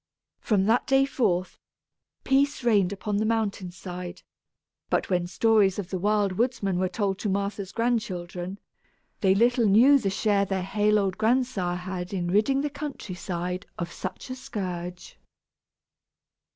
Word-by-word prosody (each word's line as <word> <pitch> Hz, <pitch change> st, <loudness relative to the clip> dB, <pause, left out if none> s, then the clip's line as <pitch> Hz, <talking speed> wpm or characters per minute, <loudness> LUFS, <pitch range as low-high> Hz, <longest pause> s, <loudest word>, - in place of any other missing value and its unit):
From 200 Hz, -4 st, +1 dB
that 225 Hz, +4 st, +2 dB
day 270 Hz, 0 st, +4 dB
forth, 185 Hz, -10 st, -1 dB, 0.6 s
peace 275 Hz, 0 st, +2 dB
reigned 205 Hz, -6 st, +3 dB
upon 200 Hz, +1 st, -2 dB
the 215 Hz, -, +1 dB
mountain 215 Hz, -4 st, -1 dB
side; 180 Hz, 0 st, -8 dB, 0.7 s
but -, -, 0 dB
when 175 Hz, -1 st, +1 dB
stories 205 Hz, -1 st, +3 dB
of 200 Hz, -3 st, -5 dB
the 185 Hz, -, -2 dB
Wild 205 Hz, 0 st, +2 dB
Woodsman 210 Hz, -7 st, 0 dB
were 185 Hz, 0 st, +1 dB
told 195 Hz, -1 st, -1 dB
to 210 Hz, -, -2 dB
Martha's 200 Hz, 0 st, -2 dB
grandchildren, 190 Hz, -6 st, -2 dB, 0.6 s
they 190 Hz, -1 st, +3 dB
little 235 Hz, +2 st, +3 dB
knew 250 Hz, +8 st, +6 dB
the 205 Hz, -6 st, -1 dB
share 200 Hz, 0 st, +1 dB
their 195 Hz, -1 st, -2 dB
hale 210 Hz, +2 st, +2 dB
old 195 Hz, -2 st, -1 dB
grandsire 220 Hz, -6 st, +1 dB
had 180 Hz, +1 st, -5 dB
in 175 Hz, -2 st, -2 dB
ridding 245 Hz, +8 st, +3 dB
the 295 Hz, -, -1 dB
country 280 Hz, -9 st, -6 dB
side 180 Hz, +1 st, -4 dB
of 170 Hz, -1 st, -4 dB
such 185 Hz, +7 st, -6 dB
a -, -, -3 dB
scourge. 180 Hz, -7 st, -6 dB
200 Hz, 150 wpm, -26 LUFS, 185-225 Hz, 0.7 s, knew